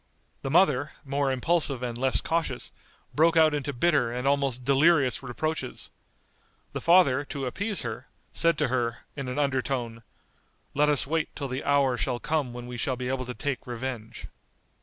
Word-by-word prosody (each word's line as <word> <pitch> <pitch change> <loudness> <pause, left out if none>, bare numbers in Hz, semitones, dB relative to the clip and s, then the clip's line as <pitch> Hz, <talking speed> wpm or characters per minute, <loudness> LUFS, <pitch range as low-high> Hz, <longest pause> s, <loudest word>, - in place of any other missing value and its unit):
The 135 - -3
mother, 150 -3 +3
more 140 0 0
impulsive 135 -1 0
and 120 -2 -3
less 130 +2 +2
cautious, 160 -7 -2 0.4
broke 165 +2 +4
out 155 -1 +6
into 145 -1 -2
bitter 140 -3 +2
and 125 +2 -2
almost 135 -3 +1
delirious 140 0 +4
reproaches. 155 +5 -3 0.8
The - - -4
father, 165 -6 +5
to 140 -1 -4
appease 200 - -2
her, 120 +3 -5 0.3
said 165 -2 +3
to 150 -4 +1
her, 120 -2 -1
in 140 -3 -5
an 125 +2 -4
under 140 -3 +1
tone, 120 -4 -3 0.7
"Let 150 +1 +3
us 145 -2 +2
wait 160 +2 -2
till 140 -2 -4
the 130 +2 -3
hour 140 -3 +2
shall 125 -3 0
come 150 -1 -1
when 120 0 -7
we 125 0 -7
shall 130 +3 -1
be 125 0 -4
able 130 -1 -2
to 125 0 -6
take 140 -4 -3
revenge." 120 -2 -5
135 Hz, 175 wpm, -27 LUFS, 125-150 Hz, 0.8 s, out